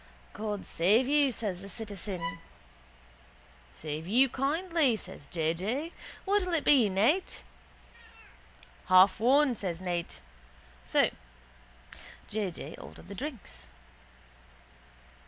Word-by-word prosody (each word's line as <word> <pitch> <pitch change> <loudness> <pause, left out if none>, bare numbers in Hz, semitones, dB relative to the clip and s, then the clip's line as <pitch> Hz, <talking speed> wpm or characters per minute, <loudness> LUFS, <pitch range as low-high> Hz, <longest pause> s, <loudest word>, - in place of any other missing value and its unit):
—God 210 -1 -4
save 205 +9 +3
you, 285 -1 +3
says 205 -6 -3
the 200 - -9
citizen. 190 -6 -5 1.3
—Save 155 +1 -6
you 255 +7 +4
kindly, 300 0 +1
says - - -10
J. 160 -2 0
J. 245 - -3 0.3
What'll 385 -3 +1
it 310 - 0
be, 260 -8 +5
Ned? 225 - +3 1.7
—Half 185 +2 +6
one, 265 +4 +4
says 180 -7 -4
Ned. 175 -2 -2 0.8
So 65 - +3 1.2
J. 210 -2 -1
J. 160 -2 -8
ordered - - -12
the - - -6
drinks. 205 - -7
210 Hz, 100 wpm, -30 LUFS, 180-275 Hz, 1.7 s, Half